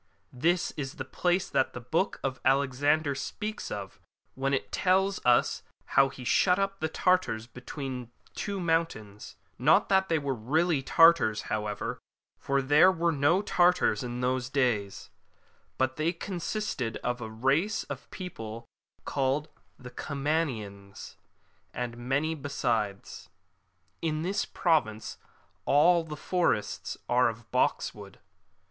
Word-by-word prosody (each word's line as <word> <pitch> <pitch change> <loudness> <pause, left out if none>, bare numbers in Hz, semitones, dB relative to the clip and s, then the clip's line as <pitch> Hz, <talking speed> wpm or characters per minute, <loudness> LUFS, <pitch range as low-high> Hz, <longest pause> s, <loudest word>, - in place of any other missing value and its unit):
This 170 +8 +1
is 135 -2 -5
the 130 - -5
place 180 +6 0
that 130 - 0
the - - -6
Book 160 +11 -1
of 135 -1 -3
Alexander 140 +3 +2
speaks 210 +10 -5
of, 100 -2 -6 0.3
when 135 +1 -1
it 135 - -1
tells 190 +1 +1
us 125 -1 +3 0.3
how 135 0 +5
he 130 - -10
shut 180 +8 +3
up 195 0 -1
the 160 - -1
Tartars 180 -11 +1
between 125 0 -7 0.2
two 200 -1 -4
mountains; 165 - -2 0.2
not - - +4
that 190 -1 +3
they 165 - +3
were 140 -2 -1
really 150 +7 +1
Tartars, 165 -7 +5
however, 105 -1 -3 0.4
for 140 0 0
there 150 +7 +6
were 170 -1 +1
no 155 +6 +2
Tartars 180 - +3
in 125 -1 -4
those 130 0 0
days, 120 -8 -1 0.7
but 130 0 0
they 155 +2 +1
consisted 175 - -3
of 125 0 -2
a 110 - -5
race 135 - +1
of - - -8
people 115 - -7 0.4
called 140 +2 0 0.5
Comanians 130 -10 -3 0.6
and 120 -1 -3
many 135 +6 -1
besides.^ 115 - -3 0.7
[In 155 -1 -1
this 195 +4 -1
province 115 -11 0 0.5
all 165 +4 +5
the 155 -2 -7
forests 175 - -1
are 125 0 +4
of 115 0 -10
box - - +1
wood.'' - - -12
140 Hz, 130 wpm, -28 LUFS, 120-170 Hz, 0.7 s, there